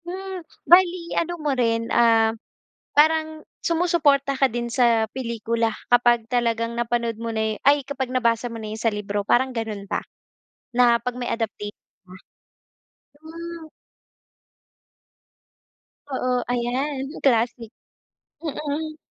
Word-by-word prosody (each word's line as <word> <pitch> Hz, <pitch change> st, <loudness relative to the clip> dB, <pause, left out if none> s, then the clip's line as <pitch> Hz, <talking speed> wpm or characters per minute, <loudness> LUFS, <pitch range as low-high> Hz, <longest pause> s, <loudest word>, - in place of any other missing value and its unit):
Hmm, 375 Hz, +1 st, -6 dB, 0.3 s
bale 355 Hz, +1 st, +7 dB, 0.2 s
ano 345 Hz, +1 st, -2 dB
mo 300 Hz, -3 st, -1 dB
rin, 230 Hz, -3 st, +1 dB
ah, 225 Hz, -1 st, +4 dB, 0.6 s
parang, 315 Hz, 0 st, +3 dB, 0.2 s
sumusuporta 320 Hz, -5 st, +2 dB
ka 270 Hz, -, +5 dB
din 235 Hz, +1 st, -3 dB
sa 235 Hz, -3 st, +3 dB
pelikula 230 Hz, -2 st, -1 dB, 0.2 s
kapag 240 Hz, -1 st, +4 dB
talagang 230 Hz, -1 st, 0 dB
napanood 235 Hz, -1 st, -1 dB
mo 230 Hz, -, -3 dB
na 220 Hz, 0 st, 0 dB
'yo -, -, -10 dB
ay, 285 Hz, 0 st, +5 dB
kapag 265 Hz, -2 st, -3 dB
nabasa 235 Hz, -1 st, +1 dB
mo 230 Hz, -, -7 dB
na 215 Hz, 0 st, -5 dB
'yon 220 Hz, -, -7 dB
sa 230 Hz, -, +3 dB
libro, 205 Hz, 0 st, -2 dB
parang 260 Hz, +1 st, +3 dB
gano'n 220 Hz, -4 st, -4 dB
ba, -, -, -1 dB, 0.7 s
na 240 Hz, -1 st, +5 dB
'pag 250 Hz, +1 st, -3 dB
may 245 Hz, -1 st, -3 dB
adaptation 210 Hz, -2 st, -4 dB, 0.3 s
na. 185 Hz, +1 st, -12 dB, 1.0 s
Hmm. 335 Hz, +1 st, -8 dB, 2.4 s
Oo, 255 Hz, -2 st, 0 dB
ayan, 260 Hz, +3 st, -1 dB, 0.2 s
classic. 235 Hz, -2 st, +1 dB, 0.7 s
Mm. 305 Hz, 0 st, -4 dB
245 Hz, 120 wpm, -23 LUFS, 230-295 Hz, 2.4 s, bale